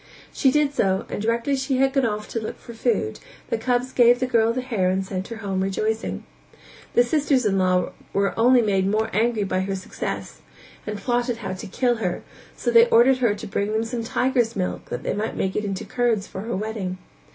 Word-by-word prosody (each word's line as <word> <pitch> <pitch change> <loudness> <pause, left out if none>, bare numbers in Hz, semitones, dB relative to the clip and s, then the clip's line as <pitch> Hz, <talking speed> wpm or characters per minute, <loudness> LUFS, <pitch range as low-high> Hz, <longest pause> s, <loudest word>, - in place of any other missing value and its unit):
She 270 - +3
did 290 +1 +2
so 190 -7 +1
and - - -4
directly 230 +5 0
she 265 0 -1
had 270 0 +2
gone 270 -4 +2
off 210 -1 -3
to 230 - -2
look 220 - -6
for 235 - -11
food, 220 - -1 0.3
the - - +2
cubs 250 +2 0
gave 245 0 +5
the 255 - +1
girl 230 -3 +3
the 255 +2 -2
hair 220 -8 0
and 190 +1 0
sent 190 0 -4
her 230 - -6
home 190 -1 -1
rejoicing. 215 +3 -2 0.7
The 240 - +6
sisters 275 -1 +1
in 195 -2 +2
law 185 -1 +2 0.2
were 200 0 +1
only 245 +1 +5
made 195 -3 +1
more 215 +2 0
angry 220 +1 +1
by 190 -1 -1
her 195 +1 -2
success 185 - -5 0.5
and 210 0 -3
plotted 240 +1 -1
how 190 - -2
to 185 - -7
kill 240 +4 +1
her, 185 -5 -2 0.3
so 240 - -1
they 230 0 +7
ordered 255 +3 +5
her 235 -5 +2
to 205 - -8
bring 200 +1 -2
them 220 +1 +1
some 230 0 -3
tiger's 245 -1 +1
milk 185 -2 -3
that - - -5
they - - -1
might 215 +2 -3
make 190 - -1
it 210 - -1
into 195 -2 -3
curds 235 -5 0
for 190 - -7
her 230 +3 -3
wedding. 200 -3 -3
225 Hz, 220 wpm, -23 LUFS, 195-245 Hz, 0.7 s, they